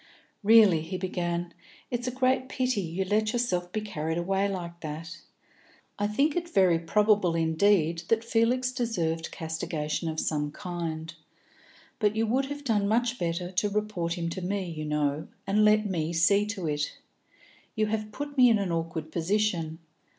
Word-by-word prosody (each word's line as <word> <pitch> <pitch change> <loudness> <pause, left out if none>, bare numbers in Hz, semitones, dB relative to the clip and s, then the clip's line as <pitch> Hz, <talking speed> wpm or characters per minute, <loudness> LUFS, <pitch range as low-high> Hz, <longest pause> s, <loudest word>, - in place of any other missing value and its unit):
"Really," 210 -6 +6
he 175 +4 -4
began, 175 -2 -2 0.4
"it's 245 0 -2
a - - 0
great 260 0 +1
pity 255 -5 0
you 180 +2 -3
let 215 +3 +1
yourself 180 -8 -1
be 215 - -2
carried 160 -6 -3
away 195 +3 +1
like 170 -3 -5
that. 165 +2 -7 0.8
I 205 - +1
think 280 +8 +1
it 345 -1 -2
very 185 - +4
probable 205 0 +2
indeed 165 0 +2
that 225 0 +2
Felix 240 +2 +1
deserved 175 -11 -1
castigation 160 0 -3
of 160 0 -3
some 150 -1 -1
kind, 165 -2 -5 0.9
but 210 -1 +2
you 225 +1 +2
would 260 +5 +1
have 285 +1 -6
done 210 -6 +1
much 240 +3 +1
better 175 +1 -2
to 190 +3 +1
report 200 -5 -2
him 170 -1 -2
to 185 - -5
me, 185 -1 -2
you 155 -1 -5
know, 150 0 -1 0.2
and 210 +2 +3
let 215 0 +5
me 170 -4 -1
see 200 +5 +3
to 205 -5 -4
it. 150 0 -2 0.8
You 215 - +2
have 215 0 -2
put 290 +4 -6
me 250 -2 +7
in 225 - +4
an 195 -3 -2
awkward 165 -1 -3
position. 170 -2 0
190 Hz, 165 wpm, -28 LUFS, 165-215 Hz, 0.9 s, me